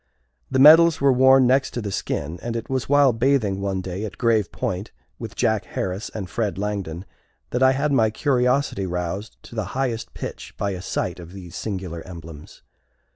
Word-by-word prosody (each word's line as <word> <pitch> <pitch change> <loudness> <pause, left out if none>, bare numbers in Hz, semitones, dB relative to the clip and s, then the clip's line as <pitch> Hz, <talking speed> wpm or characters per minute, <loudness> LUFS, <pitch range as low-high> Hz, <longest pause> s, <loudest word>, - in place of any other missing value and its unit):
The - - 0
medals 160 +4 +8
were 140 -1 +4
worn 130 +1 +6
next 130 +2 +2
the 105 -3 -4
skin, 80 -2 -3
and 115 -1 -4
it 115 +3 -5
was 130 -1 -2
while 145 -3 +5
bathing 115 -5 +1
one 95 -1 -2
day 95 +2 -5
at 105 - -6
Grave 115 -5 +1
Point, 95 +3 -3 0.3
with - - -7
Jack - - +1
Harris 95 +4 -4
and 100 -4 -4
Fred 105 0 -2
Langdon, 100 -4 -4 0.5
that 125 - -1
I 130 0 +6
had 140 +2 0
my 115 -5 +3
curiosity 125 -4 +1
roused 90 +4 -4
to - - -13
the 110 -2 -2
highest 125 -4 -2
pitch - - -7
by 100 - -1
a 90 -2 -5
sight - - -3
of 85 +1 -11
these 90 -3 -10
singular 95 -5 -5
emblems. 80 -4 -11
110 Hz, 180 wpm, -23 LUFS, 95-130 Hz, 0.5 s, medals